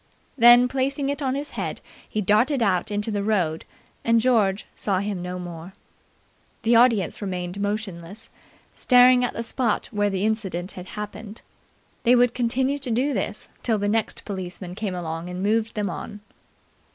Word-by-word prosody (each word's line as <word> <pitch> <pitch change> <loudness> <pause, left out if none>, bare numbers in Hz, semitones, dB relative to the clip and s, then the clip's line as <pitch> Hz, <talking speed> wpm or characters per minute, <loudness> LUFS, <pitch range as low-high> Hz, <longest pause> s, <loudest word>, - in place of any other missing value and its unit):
Then, 240 0 +7
placing 275 +2 -1
it 285 +1 -3
on 265 -1 0
his 285 +1 -4
head, - - -4 0.3
he 215 - -2
darted 230 +7 +2
out 185 -4 +1
into 210 +1 -1
the 205 -1 -1
road 185 -7 0 0.4
and 230 0 +3
George 215 -5 +2
saw 195 -3 +1
him 200 -1 -3
no 180 0 -5
more. 175 0 -8 0.9
The 230 +1 +4
audience 230 -7 +3
remained 180 -1 -4
motionless, 205 -1 -4 0.4
staring 250 0 +5
at 245 - -1
the 230 - -3
spot 235 -1 -1
where 205 -2 +1
the 195 0 -1
incident 195 -5 -2
had 180 0 -9
happened. 210 +1 -7 0.6
They 245 +2 +5
would 245 -1 +4
continue 260 +3 0
to 270 -2 -2
do 255 +5 +1
this 210 -1 -3
till 225 -3 +1
the 205 0 -1
next 220 +1 -1
policeman 185 -2 -6
came 195 -1 -4
along 165 0 -5
and 180 +1 -5
moved 220 +2 0
them 210 -1 -1
on. 205 +4 -7
210 Hz, 165 wpm, -24 LUFS, 190-240 Hz, 0.9 s, Then